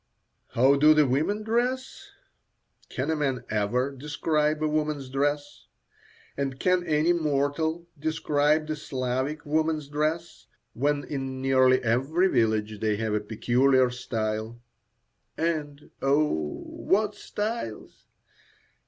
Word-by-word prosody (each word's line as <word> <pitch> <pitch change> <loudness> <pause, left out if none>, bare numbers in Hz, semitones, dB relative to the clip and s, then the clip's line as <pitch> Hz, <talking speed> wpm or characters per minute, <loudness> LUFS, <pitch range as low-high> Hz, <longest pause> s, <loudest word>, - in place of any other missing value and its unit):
"How 135 +4 +5
do 155 +2 +6
the 150 -1 +5
women 155 +11 0
dress?" 245 +4 -2 0.8
Can 135 +5 -2
a - - +1
man 135 -4 -1
ever 115 +6 0
describe 150 +2 -1
a - - +2
woman's 150 -3 -2
dress? 145 +1 -2 0.7
And 135 -1 -3
can 180 -1 +2
any 155 +2 +3
mortal 160 +1 0
describe 155 0 +1
the 155 0 -3
Slavic 130 +2 -3
woman's 155 0 0
dress, 155 +4 -2 0.3
when 145 +3 0
in 135 -2 -4
nearly 130 -1 +4
every 135 +11 +2
village 110 - +1
they 110 -1 +1
have 110 0 -2
a 105 - +2
peculiar 125 +4 +2
style? 110 -2 -3 0.8
And, 150 -3 -3
oh! 135 - 0
what 210 +1 0
styles! 210 - -5
145 Hz, 115 wpm, -26 LUFS, 130-155 Hz, 0.8 s, do